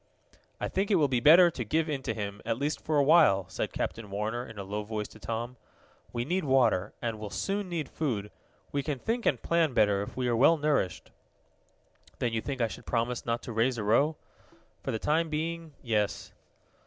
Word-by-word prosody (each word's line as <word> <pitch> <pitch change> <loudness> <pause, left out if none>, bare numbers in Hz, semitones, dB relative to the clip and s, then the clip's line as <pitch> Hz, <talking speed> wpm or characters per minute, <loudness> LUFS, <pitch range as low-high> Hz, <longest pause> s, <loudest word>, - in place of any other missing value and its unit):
"I - - -1
think 195 +1 -1
it 205 - +4
will 155 -5 +4
be 130 -2 +1
better 170 +7 +7
to 125 - -4
give 155 +9 0
in 145 -3 -2
to 120 - -2
him 100 -1 -5
at 115 0 -1
least 145 +3 -2
for 155 -1 0
a 145 - +5
while," 140 - +5
said - - -3
Captain 110 -2 -4
Warner 110 +4 -2
in 115 - -11
a 100 - -4
low 105 +2 -3
voice 105 0 -4
to 110 - -15
Tom. 115 +3 -4 0.5
"We 120 0 -2
need 180 +6 0
water, 120 -8 +2
and 115 -2 -2
will 105 -1 -5
soon 195 - -2
need 165 -5 -2
food. 110 -11 -3 0.4
We 140 - 0
can 145 0 -3
think 230 - -2
and 130 - +2
plan 165 -1 +1
better 105 -2 +3
if 100 - -7
we 125 -1 0
are 120 - +2
well 140 +8 +5
nourished." 145 - -1 1.1
"Then 120 -2 -1
you 110 - 0
think 135 0 -4
I 115 - +3
should 105 - -10
promise 120 +1 -1
not 115 0 -1
to - - -6
raise 120 +3 +1
a 110 - -2
row?" 140 +9 +3 0.7
"For - - -5
the 110 - 0
time 160 +7 +1
being 160 0 -3
yes." 105 -4 -1
125 Hz, 215 wpm, -29 LUFS, 110-155 Hz, 1.1 s, better